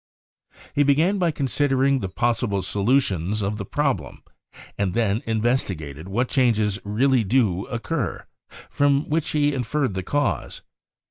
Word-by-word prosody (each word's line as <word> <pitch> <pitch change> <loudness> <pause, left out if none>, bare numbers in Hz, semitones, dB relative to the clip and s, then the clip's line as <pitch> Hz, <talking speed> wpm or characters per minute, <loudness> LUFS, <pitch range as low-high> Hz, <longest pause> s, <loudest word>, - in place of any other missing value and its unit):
He 145 - +2
began 155 +8 +3
by 175 -2 +2
considering 135 -1 +1
the 95 - -4
possible 115 -2 0
solutions 100 - +1
of 100 +2 -2
the 100 - -5
problem, 125 - -2 0.5
and 95 -3 -1
then 110 -1 +1
investigated 95 - -1
what 120 +6 0
changes 110 -7 +1
really 120 +4 +2
do 100 -4 +1
occur, 135 +5 -3 0.4
from 140 0 +1
which 155 0 0
he 145 -1 +1
inferred 130 -1 -1
the 95 - -2
cause. 110 - -2
120 Hz, 130 wpm, -23 LUFS, 100-140 Hz, 0.5 s, began